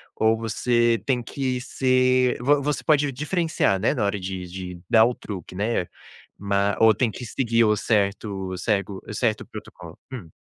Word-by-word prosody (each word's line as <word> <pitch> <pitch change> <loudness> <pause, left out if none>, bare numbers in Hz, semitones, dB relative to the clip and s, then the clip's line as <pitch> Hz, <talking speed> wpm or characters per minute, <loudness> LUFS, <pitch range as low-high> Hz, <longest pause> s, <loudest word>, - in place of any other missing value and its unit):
ou 110 0 +3
você 115 +1 +1
tem 130 -3 +1
que 130 0 -3
ser, 130 -1 +2
vo 145 +3 +3
você 145 0 -2
pode 150 -2 +2
diferenciar, 155 - 0
né, 110 - +1
na 125 -7 -1
hora 100 0 0
de 95 -1 -5
de 90 0 -7
dar 110 -1 +6
o 125 - +1
truque, 95 -7 -8
né, 100 -2 -1 0.5
ma 100 0 0
ou 110 -1 +6
tem 115 +3 0
que 125 - -8
seguir 115 -1 +1
o 105 -1 +3
certo 100 -3 -1
cego 100 +1 -1
o - - -6
certo 110 -1 -1
protocolo? - - -11
Hum. 110 -11 -8
115 Hz, 170 wpm, -24 LUFS, 100-125 Hz, 0.5 s, dar